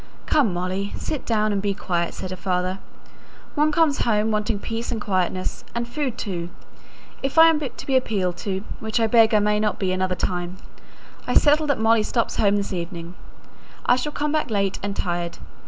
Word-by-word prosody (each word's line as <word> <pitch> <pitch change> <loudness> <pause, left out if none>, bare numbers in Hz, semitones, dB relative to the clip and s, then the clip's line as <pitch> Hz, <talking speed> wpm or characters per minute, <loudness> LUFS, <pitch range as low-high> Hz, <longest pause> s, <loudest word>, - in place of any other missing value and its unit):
"Come, 275 -10 +3
Molly! 185 +3 -2
sit 300 - -4
down 215 -2 +2
and 200 - 0
be 200 -1 -1
quiet," 170 -3 -2
said 185 - -6
her - - -3
father. 185 0 -1 0.7
"One 300 +1 +2
comes 305 -2 +3
home 220 -1 +2
wanting 210 0 0
peace 225 +3 -4
and 230 - -2
quietness 185 -2 -1
and 235 0 -1
food 260 -2 -3
too. 175 -4 -4 0.7
If 270 +3 -3
I 325 0 +10
am 310 - 0
to 275 -5 -6
be 270 - +1
appealed 200 -8 +1
to, 190 0 -3 0.2
which 220 +1 -1
I 225 - +3
beg 225 0 +5
I 215 - +5
may 210 0 +2
not 210 0 0
be 190 -2 0
another 185 0 0
time, 180 0 -2 0.7
I - - 0
settle 300 +1 +5
that 285 - +2
Molly 225 0 +4
stops 230 +2 -1
at - - +3
home 200 0 +4
this 200 -1 -2
evening. 170 -1 -5 0.7
I 245 - +5
shall 275 +4 -2
come 295 0 -1
back 310 -4 0
late 200 -3 0
and 200 0 -3
tired. 175 -1 -2
210 Hz, 200 wpm, -23 LUFS, 185-240 Hz, 0.7 s, I